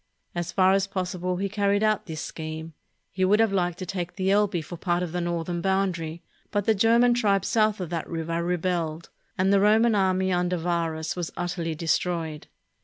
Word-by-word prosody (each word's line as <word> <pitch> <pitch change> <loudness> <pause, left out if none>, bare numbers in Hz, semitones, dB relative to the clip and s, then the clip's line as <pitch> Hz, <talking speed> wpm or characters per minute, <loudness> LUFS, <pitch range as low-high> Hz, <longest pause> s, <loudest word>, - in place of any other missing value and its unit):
As 175 0 -3
far 190 0 +4
as 195 0 +2
possible, 185 -2 -2
he 200 +2 -1
carried 205 +1 +1
out 215 -1 +1
this 160 -2 -5
scheme. 160 0 -6 0.4
He 185 - -1
would 205 +3 +4
have 225 -3 +3
liked 175 -2 0
to 185 - -5
take 180 -1 -4
the 190 0 0
Elbe 200 -4 +2
for 175 - -8
part 175 +1 0
of 175 - -4
the 180 +1 -2
northern 170 0 -2
boundary; 180 -4 -1 0.3
but 205 -1 -1
the 220 - +4
German 230 +4 +4
tribes 200 -5 +1
south 215 -2 +2
of 180 -2 -5
that 165 -2 -3
river 165 0 -2
rebelled, 170 -2 -2 0.3
and 190 +2 +3
the 200 - +5
Roman 220 +3 +4
army 190 -2 +2
under 180 0 +1
Varus 165 -2 -2
was 175 -2 -4
utterly 175 -2 -2
destroyed. 160 -1 -1
180 Hz, 190 wpm, -26 LUFS, 170-195 Hz, 0.4 s, the